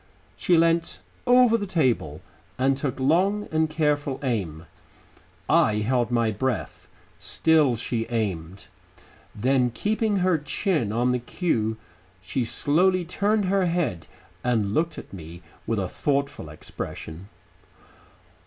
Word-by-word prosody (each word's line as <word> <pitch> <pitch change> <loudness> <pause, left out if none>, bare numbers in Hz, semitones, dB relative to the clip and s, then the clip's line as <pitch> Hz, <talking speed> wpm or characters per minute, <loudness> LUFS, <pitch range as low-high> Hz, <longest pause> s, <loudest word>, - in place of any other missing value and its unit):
She 175 - +2
leant 165 0 +2 0.3
over 245 -2 +6
the 205 - -4
table 120 - 0 0.4
and 135 +1 +2
took 135 -1 -3
long 185 +10 +2
and 160 0 +1
careful 150 -3 0
aim. 90 - -2 0.8
I 105 - +4
held 120 +3 +1
my 115 -2 +1
breath.... 125 +4 -3 0.3
Still 155 -6 +3
she 115 0 -2
aimed.... 95 -6 -3 0.7
Then 125 +3 +2
keeping 210 - 0
her 180 -4 +3
chin 150 - -1
on 120 +3 +1
the 125 - 0
cue, 115 - -1 0.4
she 120 +7 -2
slowly 175 +9 +2
turned 205 +4 +1
her 190 0 +2
head 140 - -1 0.4
and 110 -5 +1
looked 165 +7 0
up - - -7
at - - -21
me 85 -1 -10 0.2
with 115 - 0
a 95 -2 -1
thoughtful 140 - -2
expression. 80 +3 -8
130 Hz, 125 wpm, -25 LUFS, 110-170 Hz, 0.8 s, over